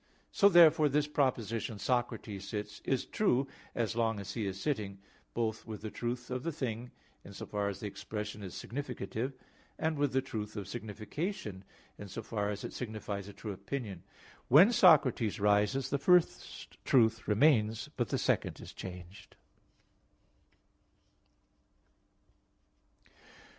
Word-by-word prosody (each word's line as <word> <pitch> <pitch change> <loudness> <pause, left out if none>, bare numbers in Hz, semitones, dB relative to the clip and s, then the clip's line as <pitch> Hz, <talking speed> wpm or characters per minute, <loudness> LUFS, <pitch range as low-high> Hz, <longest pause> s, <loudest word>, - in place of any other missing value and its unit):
So 200 - +6
therefore 160 -4 +7
this 145 +1 +2
proposition, 115 -7 -1
"Socrates 110 -3 -2
sits," 105 0 -5
is 135 -2 0
true, 135 -11 +2 0.3
as 115 -2 -1
long 115 -2 +1
as 100 0 -6
he 110 -4 -2
is 95 0 -4
sitting, 105 -9 -2 0.4
both 115 -1 -2
with 110 -1 -7
the 110 - -4
truth 125 +1 -4
of 125 0 -2
the 165 - -2
thing, 125 -5 -4 0.3
in 100 - -11
so - - -7
far 100 -1 -1
as 100 - -6
the - - -5
expression 105 +1 -5
is 95 -3 -7
significative, 125 -1 -4 0.4
and 155 -2 -1
with 145 -2 +2
the 130 - +2
truth 110 -5 -5
of 100 - -5
signification, 110 - -5 0.4
in 105 - -7
so 115 +4 -6
far 105 -2 -2
as 105 -1 -4
it - - -5
signifies 105 -4 -5
a 100 - -9
true 105 - -6
opinion. 100 -1 -5 0.5
When 175 - +8
Socrates 140 - +5
rises, 105 +6 +2
the 140 - +1
first 180 +3 +1
truth 115 -3 +3
remains, 110 +1 +3
but 120 -2 -1
the - - 0
second - - 0
is - - -10
changed. 90 +1 -10
115 Hz, 140 wpm, -32 LUFS, 105-135 Hz, 0.5 s, When